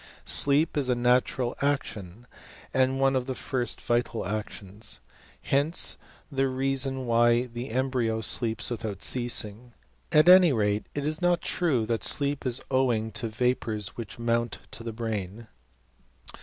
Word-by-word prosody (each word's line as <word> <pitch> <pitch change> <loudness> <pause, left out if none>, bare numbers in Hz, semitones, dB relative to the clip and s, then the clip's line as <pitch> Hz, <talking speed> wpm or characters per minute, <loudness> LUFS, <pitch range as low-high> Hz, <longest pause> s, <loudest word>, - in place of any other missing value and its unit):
Sleep 150 +3 +3
is 135 -3 +1
a 125 - +3
natural 125 0 +1
action, 120 -7 -3 0.5
and 130 0 +2
one 135 0 +3
of 130 0 -1
the 130 - -3
first 125 -3 -2
vital 120 -2 -1
actions. 105 0 -5 0.4
Hence 145 +5 +2 0.3
the 135 -1 +1
reason 135 0 0
why 120 0 +3
the 120 +1 -7
embryo 120 -2 -1
sleeps 115 +2 +2
without 110 -4 -4
ceasing. 120 -1 +1 0.4
At 155 0 +5
any 180 -4 +8
rate 105 -2 0
it 145 -1 -2
is 155 +2 -1
not 175 0 +2
true 145 -11 0
that 115 0 -2
sleep 140 -1 0
is 125 0 -2
owing 120 -4 +1
to 110 +2 -4
vapours 110 -3 -1
which 115 -4 -8
mount 115 -1 -1
to 115 - -8
the 115 - -4
brain. 110 -1 -5
120 Hz, 140 wpm, -27 LUFS, 110-135 Hz, 0.5 s, any